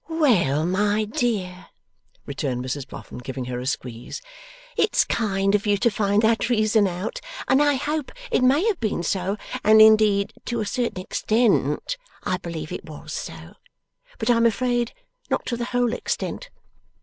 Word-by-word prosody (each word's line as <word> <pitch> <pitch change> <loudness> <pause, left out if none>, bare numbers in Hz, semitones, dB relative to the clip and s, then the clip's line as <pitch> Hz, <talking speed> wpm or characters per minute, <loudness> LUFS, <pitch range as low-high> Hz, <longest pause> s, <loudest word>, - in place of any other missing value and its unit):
'Well, 200 - +2
my 205 +4 +1
dear,' 205 -5 -2 0.6
returned 130 -3 -3
Mrs 135 +1 -4
Boffin, - - -9
giving 130 +1 -5
her 125 0 -4
a 125 - -5
squeeze, 125 - -4 0.6
'it's - - +3
kind 195 -3 0
of 210 0 +1
you 205 0 +3
to 235 +3 +2
find 205 +1 +1
that 225 +2 +2
reason 215 -3 +3
out, 185 - -4 0.3
and 265 - +4
I 290 -1 +4
hope 295 +1 -2 0.2
it - - +2
may 280 +9 +4
have 440 -5 +1
been 210 -6 -1
so, 190 +3 -1 0.3
and 215 +1 +6
indeed 215 -2 +5
to 235 -1 -2
a 215 - -1
certain 235 -3 -2
extent 230 - +1 0.3
I 185 - 0
believe 160 -3 -6
it - - -6
was 150 - -8
so, - - -7 0.6
but - - +1
I 235 - +4
am 230 0 +5
afraid 240 +1 0 0.4
not - - -1
to 240 - -2
the 235 0 -3
whole 245 -1 0
extent. - - -3
210 Hz, 165 wpm, -24 LUFS, 180-240 Hz, 0.6 s, and